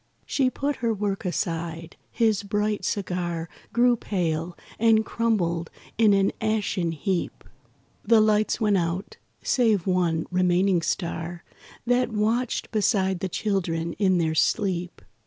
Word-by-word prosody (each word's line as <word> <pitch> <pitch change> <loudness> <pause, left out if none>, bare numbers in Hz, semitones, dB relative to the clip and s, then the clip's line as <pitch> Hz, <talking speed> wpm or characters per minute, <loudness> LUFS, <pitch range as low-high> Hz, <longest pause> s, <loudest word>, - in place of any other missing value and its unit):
She 265 -3 +1
put 280 +2 -2
her 230 -1 0
work 200 -1 -2
aside; 165 -1 -3
his 220 -4 +1
bright 210 +1 -1
cigar 175 -4 -2 0.2
Grew 240 +1 +4
pale, 170 -5 -2 0.2
and 220 -1 +4
crumbled 175 -9 0 0.3
in 220 -2 +4
an 195 0 +2
ashen 210 -6 0
heap. 180 +3 -3 0.6
The 230 -1 +5
lights 215 +1 +2
went 210 -3 +3
out, 175 +4 -3 0.3
save 220 -8 +2
one 175 -3 +1
remaining 180 0 +2
star 170 0 -3 0.4
That 245 0 +2
watched 220 +3 -1
beside 195 -4 +1
the 190 0 -3
children 170 -4 -1
in 190 -3 +3
their 160 -2 +1
sleep. 180 +1 0
195 Hz, 125 wpm, -25 LUFS, 170-220 Hz, 0.6 s, The